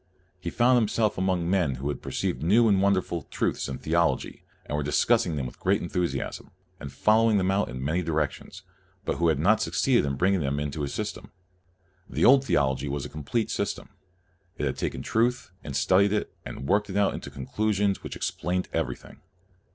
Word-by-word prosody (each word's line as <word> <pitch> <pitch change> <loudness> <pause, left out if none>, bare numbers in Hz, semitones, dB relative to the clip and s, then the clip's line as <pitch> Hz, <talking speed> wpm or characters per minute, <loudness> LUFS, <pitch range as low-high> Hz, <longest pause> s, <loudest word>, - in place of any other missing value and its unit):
He - - -4
found 125 +1 +4
himself 110 -1 +1
among 90 -2 0
men 90 -7 +1
who 65 +3 -5
had 75 - -4
perceived 65 - -2
new 110 +9 +4
and 100 -3 +3
wonderful 95 -5 0
truths - - -1
in 65 - -4
theology, 85 +2 0 0.2
and 75 - -3
were 75 - 0
discussing 85 +5 +2
them 70 -3 -2
with 60 - -9
great - - +2
enthusiasm, 90 -1 -3 0.3
and 70 - -7
following 110 +8 +3
them 95 -1 +1
out 100 +1 +1
in 65 +1 -5
many 80 +5 0
directions, 80 -4 -3 0.4
but - - -1
who 85 - +2
had 80 - +3
not 105 +9 +3
succeeded 125 +3 +2
in 70 -1 -1
bringing 95 +6 +2
them 70 -2 -1
into 75 +1 -3
a - - -1
system. - - -5 0.8
The - - +1
old 135 +3 +7
theology 70 - +1
was 70 0 -3
a - - -7
complete 75 - -2
system. - - -3 0.7
It - - -1
had 65 - -1
taken - - -3
truth, 120 -2 0
and 70 - -6
studied 95 +9 +3
it, 105 - -2
and 65 - -7
worked 105 +4 +2
it 95 - -3
out 100 -1 +3
into - - -7
conclusions 100 +7 -1
which - - -7
explained 90 +1 -2
everything. - - -4
90 Hz, 190 wpm, -26 LUFS, 70-105 Hz, 0.8 s, old